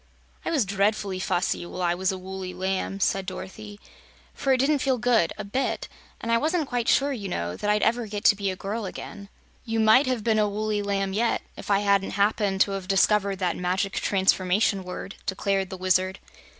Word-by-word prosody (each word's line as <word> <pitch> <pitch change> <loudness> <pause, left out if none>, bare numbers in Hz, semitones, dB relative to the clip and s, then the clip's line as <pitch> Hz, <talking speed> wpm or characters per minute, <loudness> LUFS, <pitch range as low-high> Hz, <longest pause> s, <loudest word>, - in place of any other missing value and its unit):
"I - - -2
was 295 -9 +2
dreadfully 200 0 0
fussy 175 -2 0
while 175 +1 -5
I 175 0 +2
was 185 +2 0
a 190 - -4
woolly 185 0 -6
lamb," 190 +1 -2
said 195 0 0
Dorothy, 205 +2 -8 0.5
"for 270 - -1
it 260 - +5
didn't 280 +3 +2
feel 265 -1 +1
good, 235 -7 +2
a 210 - -4
bit. 230 +7 -2 0.3
And 230 - -3
I 230 - +4
wasn't 315 +1 0
quite 245 -2 -2
sure, 280 +1 +3
you 205 -6 -5
know, 85 - -3
that 210 - -3
I'd 210 0 +2
ever 235 0 +1
get 205 0 -5
to 210 - +6
be 200 -1 -2
a 185 - -3
girl 205 +3 -4
again." 200 +1 -8 0.3
"You 225 -2 -2
might 220 +5 +5
have 250 -4 -1
been 220 -1 +2
a 210 -1 +2
woolly 210 0 -1
lamb 195 -1 -1
yet, 230 +3 +1
if - - -9
I 200 0 +3
hadn't 200 -1 +1
happened 200 -1 +1
to 200 - +4
have 195 -1 -4
discovered 200 0 +3
that 185 -2 -1
Magic 185 +2 -1
Transformation 190 0 +2
Word," 180 +2 -7
declared 195 0 0
the 190 - -6
Wizard. 185 +1 +1
200 Hz, 205 wpm, -25 LUFS, 190-220 Hz, 0.5 s, to